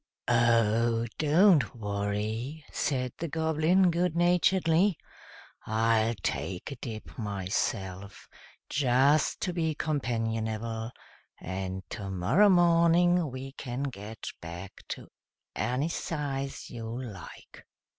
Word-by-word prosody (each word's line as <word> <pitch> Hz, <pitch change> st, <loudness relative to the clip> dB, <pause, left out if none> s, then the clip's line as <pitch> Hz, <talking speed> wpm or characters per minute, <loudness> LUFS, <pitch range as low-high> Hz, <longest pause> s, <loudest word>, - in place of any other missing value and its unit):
"Oh! 115 Hz, -1 st, +3 dB
don't 155 Hz, -, +4 dB
worry," 110 Hz, +7 st, -3 dB
said 125 Hz, -3 st, -1 dB
the 170 Hz, -, -2 dB
Goblin, 160 Hz, +4 st, +2 dB
good 170 Hz, 0 st, 0 dB
naturedly. 175 Hz, +1 st, +3 dB, 0.7 s
"I'll 115 Hz, +1 st, +2 dB
take 95 Hz, +9 st, -3 dB
a -, -, -4 dB
dip 115 Hz, 0 st, -8 dB
myself, 95 Hz, -1 st, -3 dB, 0.4 s
just 140 Hz, +2 st, +3 dB
to 180 Hz, -, -1 dB
be 160 Hz, -3 st, 0 dB
companionable, 115 Hz, -5 st, -2 dB, 0.5 s
and 95 Hz, +1 st, -4 dB
tomorrow 100 Hz, -, +2 dB
morning 175 Hz, -1 st, +4 dB
we 130 Hz, +1 st, -7 dB
can 130 Hz, -1 st, -5 dB
get 110 Hz, -5 st, -6 dB, 0.2 s
back 85 Hz, +3 st, -7 dB, 0.2 s
to -, -, -6 dB, 0.5 s
any 125 Hz, +8 st, 0 dB
size 140 Hz, -5 st, -4 dB
you 115 Hz, 0 st, -5 dB
like." 105 Hz, -9 st, -10 dB
125 Hz, 95 wpm, -29 LUFS, 110-160 Hz, 0.7 s, don't